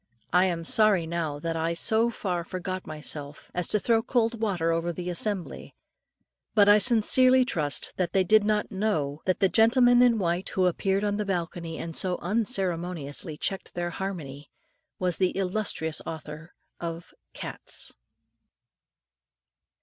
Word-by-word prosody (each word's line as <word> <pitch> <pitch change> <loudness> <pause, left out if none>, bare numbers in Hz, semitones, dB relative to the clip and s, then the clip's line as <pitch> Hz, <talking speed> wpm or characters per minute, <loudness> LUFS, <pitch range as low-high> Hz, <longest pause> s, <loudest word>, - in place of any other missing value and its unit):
I 180 +1 +5
am 170 -3 -2
sorry 215 -7 +3
now 160 -3 -3
that 165 +2 -3
I 165 +1 -1
so 220 +6 +2
far 180 -6 -3
forgot 185 +1 -5
myself, 150 -1 -7
as 180 -1 0
to - - +3
throw 225 +1 +2
cold 230 -1 0
water 180 -7 0
over 165 +1 -1
the 180 +1 -5
assembly; 190 +1 -4 0.8
but 205 -2 +6
I 205 +1 +7
sincerely 255 +3 +5
trust 150 - 0
that 180 -2 -1
they 190 - +3
did 215 +3 +4
not 210 0 0
know, 160 -8 -1
that 185 - 0
the 195 - +5
gentleman 245 +4 +5
in 245 -2 +5
white, 180 -1 -1
who 185 - +1
appeared 195 +3 0
on 205 -1 0
the 210 - -1
balcony, 170 -3 -3
and 165 -1 -5
so 180 -1 0
unceremoniously 175 - -2
checked 195 +4 -4
their 175 0 -2
harmony, 155 -7 -6 0.5
was 180 -2 -1
the 185 0 +1
illustrious 185 -5 -1
author 160 +1 -8 0.2
of 170 0 -6 0.2
"CATS." - - -6
180 Hz, 150 wpm, -27 LUFS, 165-210 Hz, 0.8 s, I